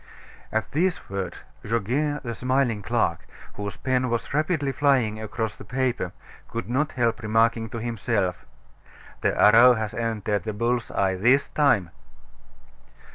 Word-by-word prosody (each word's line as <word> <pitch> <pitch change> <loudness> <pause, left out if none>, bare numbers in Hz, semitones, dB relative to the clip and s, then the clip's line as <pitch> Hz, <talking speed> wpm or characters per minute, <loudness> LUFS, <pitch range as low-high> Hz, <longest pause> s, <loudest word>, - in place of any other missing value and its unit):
At 110 -2 -2
these 170 - -1
words, 95 -3 -3 0.3
Goguet, 125 +8 -1
the 120 -2 -4
smiling 125 -3 0
clerk, 100 - -1 0.3
whose 100 0 -6
pen 130 -1 0
was 115 +1 -2
rapidly 155 -2 0
flying 130 -6 +1
across 110 -1 -3
the - - -11
paper, 125 -7 -1 0.4
could 115 0 -5
not 140 +6 0
help 120 -2 0
remarking 115 +1 +2
to 115 - -6
himself: 110 -5 -1 0.8
"The - - 0
arrow 120 +4 +7
has 110 -1 -3
entered 110 -3 -1
the 110 +4 -4
bull's 115 +2 -1
eye 95 -1 0
this 125 +8 +3
time!" 110 - +2
115 Hz, 135 wpm, -25 LUFS, 105-130 Hz, 0.8 s, arrow